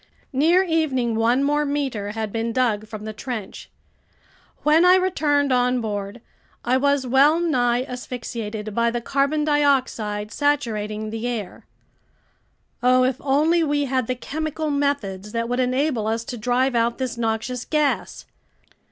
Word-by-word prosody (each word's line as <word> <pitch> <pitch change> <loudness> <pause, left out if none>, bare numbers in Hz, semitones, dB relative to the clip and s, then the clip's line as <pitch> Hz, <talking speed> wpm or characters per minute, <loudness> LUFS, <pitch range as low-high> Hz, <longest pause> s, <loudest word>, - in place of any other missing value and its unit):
Near 330 +8 +4
evening 300 -9 0
one 235 +4 +2
more 295 +1 +2
meter 270 -8 -2
had 220 -1 -3
been 230 +1 -2
dug 225 -4 0
from 215 -1 -8
the 215 - -5
trench. 225 -3 -6 0.9
When 310 +3 +5
I 360 +1 +7
returned 295 -7 +1
on 250 0 +2
board, 205 0 -4 0.4
I 245 +2 +2
was 280 0 +2
wellnigh 265 -2 +3
asphyxiated 230 -4 -6
by 235 +2 +2
the 240 +1 -2
carbon 280 +5 0
dioxide 260 -8 +1
saturating 215 -7 -1
the 225 +2 -3
air. 225 -6 -5 1.1
Oh, 255 +1 +4
if 255 0 +1
only 310 +5 +2
we 290 -1 0
had 260 -3 -1
the 255 - -1
chemical 310 +3 -3
methods 230 -9 -2
that 230 0 -1
would 245 +1 -1
enable 255 -2 0
us 225 +1 -1
to 245 - -6
drive 250 +3 +1
out 235 0 +1
this 255 -2 -3
noxious 235 +2 -2
gas! 300 -2 -1
250 Hz, 145 wpm, -22 LUFS, 225-285 Hz, 1.1 s, I